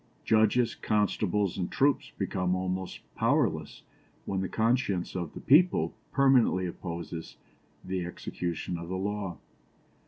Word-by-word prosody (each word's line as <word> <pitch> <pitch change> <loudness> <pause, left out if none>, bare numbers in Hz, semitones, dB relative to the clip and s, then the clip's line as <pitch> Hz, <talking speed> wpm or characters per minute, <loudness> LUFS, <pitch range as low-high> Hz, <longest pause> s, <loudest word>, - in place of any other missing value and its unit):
Judges, 110 +2 +3
constables, 105 -2 0
and 90 - -2
troops 140 0 +2
become 90 -1 0
almost 95 0 -3
powerless - - 0 0.4
when 95 -1 -1
the 95 - -2
conscience 110 -5 +1
of 85 -4 -4
the - - -6
people 175 +6 +4 0.2
permanently 130 -9 +4
opposes 85 -1 -6 0.5
the 95 -1 -2
execution 85 0 -4
of 85 0 -7
the 95 - -2
law. 100 -1 -3
95 Hz, 120 wpm, -29 LUFS, 90-110 Hz, 0.5 s, people